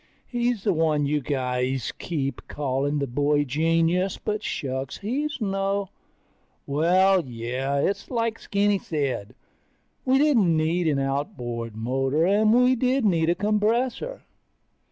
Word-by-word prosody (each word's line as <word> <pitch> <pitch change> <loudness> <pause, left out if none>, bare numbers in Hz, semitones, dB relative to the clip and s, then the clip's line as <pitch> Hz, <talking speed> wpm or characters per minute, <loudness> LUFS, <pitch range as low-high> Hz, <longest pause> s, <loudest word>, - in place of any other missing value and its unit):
He's 240 -3 -1
the 200 - +2
one 155 -3 +1
you 150 +1 0
guys 130 -2 -1
keep 140 -5 -3
calling 140 +1 -1
the 140 - 0
boy 145 +3 +1
genius, 165 +6 +1
but 210 0 -3
shucks, 135 -7 -4
he's 280 +9 -3
no... 195 -2 -1 0.8
Well, 180 +6 +3
yeah, 125 +3 -3
it's 200 +7 -1
like 230 -2 -1
Skinny 200 0 +1
said, 140 - -3 0.7
we 260 +1 +3
didn't 235 - +3
need 165 +2 +1
an 150 -3 +2
outboard 135 - -3
motor, 135 +7 0
and 210 +3 +3
we 250 +2 +5
did 255 +1 +1
need 165 -5 +2
a 170 - +3
compressor. 230 - 0
165 Hz, 130 wpm, -25 LUFS, 140-210 Hz, 0.8 s, we